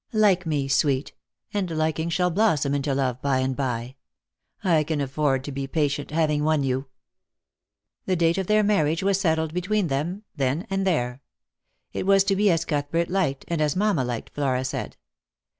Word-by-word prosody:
Like 200 -5 +3
me, 145 -3 0
sweet, 135 0 +1 0.4
and 200 -3 -1
liking 160 0 -1
shall 180 +1 +1
blossom 160 -8 +2
into 140 -1 0
love, 130 -2 -1
by 140 -2 +1
and 130 0 0
by. 125 -1 -3 0.7
I 165 -5 +3
can 150 0 -2
afford 135 -1 0
to 145 - -6
be 135 0 -4
patient, 145 -1 -1
having 150 -1 +1
won 155 -2 +2
you." 135 +1 -1 1.2
The 185 - +2
date 170 +1 +2
of 190 - -2
their 215 0 +4
marriage 165 -5 +2
was 195 0 +2
settled 160 -3 +1
between 185 +1 0
them 165 +9 -2
then 140 +4 -1
and 195 0 0
there. 125 -7 0 0.7
It - - -3
was 195 -1 +5
to 195 0 +1
be 205 +1 +3
as 170 -1 +1
Outhbert 155 +3 -1
liked, 175 -8 0
and 170 -2 -1
as 150 -2 +1
mamma 195 -7 +2
liked, 120 -2 -4
Flora 130 -3 0
said. 130 - -4
155 Hz, 175 wpm, -25 LUFS, 135-180 Hz, 1.2 s, was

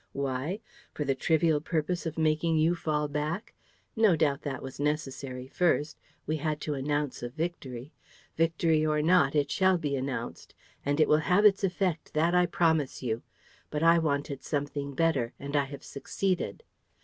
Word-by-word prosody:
Why? 140 - -2 0.3
For 150 - -2
the 135 - +2
trivial 160 +2 +2
purpose 165 +2 -1
of 160 - -5
making 160 +1 +2
you 160 +2 +3
fall 150 -3 -1
back? 150 +7 -3 0.4
No 220 -6 +5
doubt, 145 -3 +1
that 135 -3 -4
was 135 0 -8
necessary 135 -3 -2
first: 150 -1 +1 0.3
we 155 +1 -1
had 155 0 -2
to 150 - -2
announce 145 0 -2
a 120 - -4
victory. 140 -3 -5 0.4
Victory 165 -1 +2
or 150 -1 +1
not, 160 -4 +4
it 145 -1 +1
shall 190 -1 +3
be 145 -4 -2
announced; 130 -3 -5 0.3
and 145 +2 0
it 155 - +5
will 150 - +5
have 200 +4 +5
its 200 -1 +5
effect, 180 -4 -1
that 165 +3 +3
I 180 0 +4
promise 160 -7 +1
you. 115 -1 -1 0.5
But 150 +1 -2
I 165 0 +6
wanted 140 -3 -1
something 145 -1 -3
better; 140 -7 +1
and 140 +1 -5
I 140 -1 +3
have 140 0 -9
succeeded." 185 - -2
150 Hz, 170 wpm, -29 LUFS, 140-165 Hz, 0.5 s, I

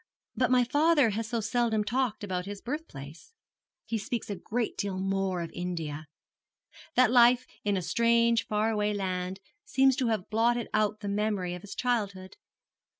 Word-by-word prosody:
But 255 - +1
my 250 -1 +4
father 290 -1 +3
has 220 +2 -3
so 235 -2 -1
seldom 220 0 +1
talked 240 0 -1
about 185 -2 -3
his 205 0 -6
birthplace. 235 - -8 0.5
He 225 - -2
speaks 235 -1 -4
a - - -2
great 225 +5 -3
deal 200 -2 -3
more 195 -1 -1
of 165 - -7
India. 160 -4 -4 0.9
That 250 -2 +5
life 245 0 +6 0.2
in 205 -1 +1
a 185 - -2
strange 235 +3 +2
far 215 +1 +1
away 210 -1 0
land 185 -1 -3 0.2
seems 270 -11 +3
to 260 -4 +1
have 215 -3 -2
blotted 235 +2 +1
out 215 0 +1
the 205 - -5
memory 200 -3 -1
of 180 - -7
his 205 - -9
childhood. 200 -6 -2
215 Hz, 165 wpm, -29 LUFS, 190-240 Hz, 0.9 s, life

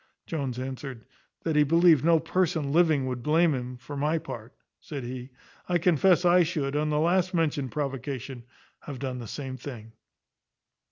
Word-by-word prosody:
Jones 135 -6 -3
answered, 130 -2 -6 0.4
"That 160 -2 -1
he 150 - +5
believed 165 -1 +5
no 165 0 +5
person 160 -5 0
living 160 -5 +3
would 125 -2 -3
blame 160 +4 +3
him; 125 -1 -4
for 140 +4 -9
my 150 +3 +1
part," 120 -5 -8 0.2
said 140 -4 -7
he, 125 +1 -6 0.4
"I 175 - +3
confess 180 +1 +3
I 180 +1 +6
should, 150 -5 -1
on 150 +1 +1
the 150 - +1
last 180 +3 +2
mentioned 150 -5 0
provocation, 135 -3 -4 0.3
have 140 -3 -8
done 130 -1 -4
the 120 - -7
same 130 +2 -6
thing." 120 -4 -9
145 Hz, 165 wpm, -27 LUFS, 130-165 Hz, 0.4 s, I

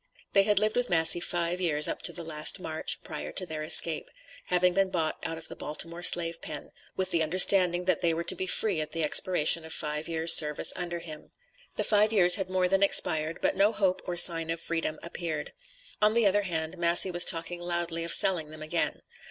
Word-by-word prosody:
They 195 - +5
had 205 +1 -1
lived 215 +1 0
with 245 0 -2
Massey 165 0 +3
five 175 +1 -4
years 150 -4 +2
up - - -5
to - - 0
the 170 - -9
last 155 +3 0
March 160 -3 -4
prior 150 - -8
to 185 - -4
their 160 -3 -8
escape, 155 +1 +3 0.4
having 180 0 0
been 195 +1 -1
bought 165 -4 -4
out 165 - -5
of 165 - -1
the - - -10
Baltimore 165 +3 -5
slave 170 -2 +3
pen, 150 -2 -7 0.3
with 190 - -4
the 165 - -1
understanding 180 +2 +2
that 185 - -1
they 170 - 0
were 165 +1 -4
to - - +4
be 185 - -6
free 190 -4 0
at 155 - -7
the 165 -1 -3
expiration 165 0 +3
of 160 - -11
five 150 0 -5
years' 165 0 +4
service 150 -1 +3
under 175 -1 -6
him. 155 -3 -11 0.5
The - - -3
five 210 0 0
years 180 -5 +5
had 190 -2 -6
more 185 -1 -1
than 195 +1 -1
expired, 160 -5 +2
but - - -1
no 200 +3 +1
hope 190 -4 -2
or 175 -1 -6
sign 165 -2 +5
of 165 0 -4
freedom 165 -1 -4
appeared. 170 -3 -7 0.5
On 210 +1 +1
the 235 -2 +1
other 205 +1 +1
hand, 170 -2 -6
Massey 175 +2 +3
was 175 0 +4
talking 175 +1 0
loudly 170 -1 -4
of 170 - -5
selling 170 -5 +3
them 155 0 -11
again. 155 - -3
170 Hz, 220 wpm, -26 LUFS, 160-185 Hz, 0.5 s, They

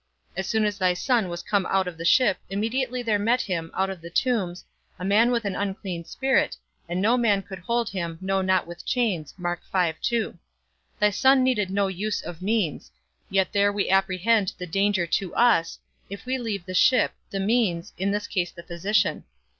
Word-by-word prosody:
_As 190 - -2
soon 220 -1 +1
as 205 -1 -2
thy 180 -1 +2
Son 230 -1 +1
was 175 0 -5
come 200 -1 0
out 190 -1 +1
of 180 - -5
the 165 +1 -7
ship, 245 +3 +4
immediately 245 +5 -1
there 215 -3 +1
met 235 +5 +2
him, 165 -4 -3
out 195 0 0
of 185 -3 -8
the 170 - -9
tombs, 185 -4 -1 0.3
a 180 - -5
man 215 +5 +4
with 235 -3 0
an 200 - -2
unclean 190 -4 -4
spirit, 265 +6 +1 0.3
and 175 +1 -1
no 225 +6 +3
man 210 -5 +2
could 190 -1 -9
hold 235 +5 -1
him, 170 -4 -4
no 190 +1 0
not 185 -1 +2
with 175 0 -10
chains._ 180 - -1 0.7
Thy 210 - +4
Son 265 +5 +4
needed 220 -7 +1
no 200 +1 +1
use 195 +2 -2
of 175 0 -8
means; 200 -6 -1 0.4
yet 190 -1 +1
there 200 0 +3
we 200 -2 -1
apprehend 195 +2 +2
the 180 - -5
danger 195 +1 +1
to 180 +2 -2
us, 225 -9 +3 0.3
if 200 +4 -8
we 260 +1 -1
leave 210 -7 -4
the 185 - -6
ship, 255 +7 +4 0.2
the 195 - -3
means, 195 -5 0
in 190 +2 -1
this 205 +1 -1
case 175 -2 -1
the 170 - -12
physician. 180 +6 0
195 Hz, 190 wpm, -25 LUFS, 180-225 Hz, 0.7 s, ship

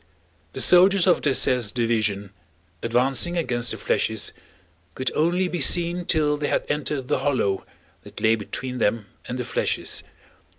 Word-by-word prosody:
The - - -4
soldiers 185 +1 +6
of 180 -2 +3
Dessaix's 125 -5 +2
division 110 -4 -1 0.5
advancing 130 +8 +1
against 120 -7 -1
the - - -1
flèches - - -1 0.6
could 130 - -2
only 175 +4 +1
be 175 -1 -4
seen 175 +4 +3
till 150 -3 +1
they 145 0 -2
had - - -1
entered 145 -2 -2
the 145 - 0
hollow 130 -8 -1 0.3
that - - -12
lay 110 - +3
between 125 +4 -5
them 105 0 0 0.2
and 125 - -5
the 125 - -3
flèches. 115 - -1
130 Hz, 145 wpm, -23 LUFS, 115-170 Hz, 0.6 s, soldiers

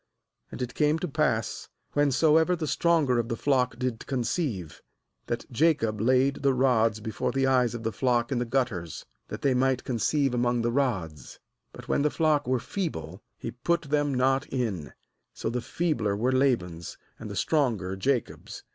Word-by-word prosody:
4lAnd 125 - -4
it 125 - -5
came 150 +1 +2
to 180 - -3
pass, 140 - -1 0.2
whensoever 155 +4 +3
the 165 -2 -3
stronger 155 -6 +2
of 115 0 -2
the 115 - -1
flock 130 -3 +1
did 125 -3 -3
conceive, 120 - -2 0.5
that - - -3
Jacob 115 -7 +2
laid 130 +3 +3
the 135 -2 +1
rods 115 -4 +2
before 110 +2 -3
the 135 +1 +1
eyes 125 -3 +2
of 115 - -6
the 115 - -1
flock 120 0 0
in 130 - +1
the 120 - -1
gutters, 115 - -2 0.2
that - - -7
they 135 - +3
might 130 0 +1
conceive 135 +3 0
among 120 -1 +1
the 120 - +1
rods; 100 - -2 0.5
when - - +1
the 150 - +3
flock 150 -3 +1
were 130 0 +2
feeble, 105 - -5 0.2
he - - -5
put 170 +8 -1
them, 145 -1 0
not 135 +1 +1
in; 110 - -3 0.4
so 110 - -3
the 125 +1 -2
feebler 120 -11 -1
were 125 +5 +1
Laban's, 105 - 0 0.2
and - - -7
the - - -6
stronger 115 - 0
Jacob's. 125 +4 -2
125 Hz, 170 wpm, -27 LUFS, 115-140 Hz, 0.5 s, whensoever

